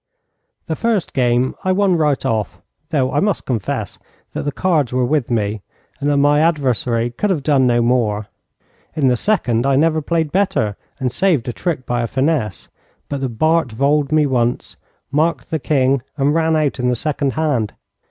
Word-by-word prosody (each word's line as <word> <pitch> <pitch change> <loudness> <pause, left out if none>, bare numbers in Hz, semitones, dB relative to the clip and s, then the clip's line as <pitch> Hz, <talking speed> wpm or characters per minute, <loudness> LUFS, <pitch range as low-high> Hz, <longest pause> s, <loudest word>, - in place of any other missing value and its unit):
The 160 - -2
first 225 -1 -1
game 125 0 +1
I 185 - +1
won 190 -1 +3
right 150 -4 +1
off, 110 -2 -1 0.3
though 130 -4 +1
I 145 - +2
must 200 +2 0
confess 115 -6 -3 0.3
that - - -4
the 145 - 0
cards 155 -6 +1
were 125 0 +1
with 145 -1 0
me, 105 -3 -1 0.4
and 145 0 0
that 145 - +2
my 145 +1 +4
adversary 125 - +1
could 205 +12 -1
have 165 -8 0
done 135 -4 +3
no 120 -1 +3
more. 115 -4 +1 0.7
In 140 -4 +2
the 125 - +3
second, 120 - +1
I 135 - +3
never 155 +2 +2
played 160 0 -1
better 180 - +1 0.2
and 130 -3 -1
saved 160 -3 +1
a - - -3
trick 155 -5 -3
by 120 0 -1
a 115 - -1
finesse, 130 - -1 0.4
but 140 -1 -3
the 135 - -1
Bart 155 +3 +1
voled 140 +5 +1
me 155 -1 +4
once, 120 -3 -1 0.4
marked 150 -2 0
the 160 - 0
king, 135 -2 +1 0.2
and 140 +1 +2
ran 160 0 +2
out 150 -3 0
in 125 0 +1
the 125 - +1
second 140 0 -1
hand. 140 -10 0
140 Hz, 185 wpm, -18 LUFS, 120-155 Hz, 0.7 s, my